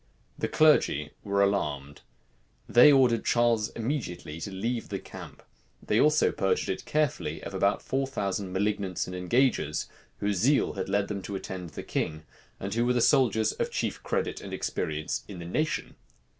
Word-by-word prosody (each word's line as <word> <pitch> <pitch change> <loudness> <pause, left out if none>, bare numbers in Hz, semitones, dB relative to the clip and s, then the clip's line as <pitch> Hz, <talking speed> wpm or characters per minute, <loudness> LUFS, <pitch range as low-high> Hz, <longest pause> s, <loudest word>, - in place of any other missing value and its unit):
The - - -2
clergy 75 - +3
were 100 -1 +2
alarmed. 75 -8 -1 0.7
They 125 +5 +7
ordered 125 -4 +4
Charles 120 -2 +2
immediately 100 - -4
to 100 - -4
leave 115 +5 -3
the - - -2
camp. - - -11 0.4
They 105 - 0
also 155 +1 +4
purged 95 - 0
it 95 - -3
carefully 150 -3 -1
of - - -7
about 100 +1 +1
four 135 0 -1
thousand 100 -6 -3
malignants 100 -1 -1
and 90 - -7
engagers 90 - +1 0.3
whose 100 -1 -1
zeal 135 +10 +3
had 95 0 -4
led 100 0 +1
them 100 -2 -4
to 100 +1 -6
attend 95 -2 -6
the - - -8
king, 80 0 -3 0.4
and 100 +1 -4
who 120 +2 +1
were 125 - +3
the 125 - +2
soldiers 115 -4 +3
of - - -2
chief - - -3
credit - - -2
and - - -8
experience 75 -1 -3
in 100 - -8
the 85 - -7
nation. 155 - -2
100 Hz, 170 wpm, -28 LUFS, 90-120 Hz, 0.7 s, They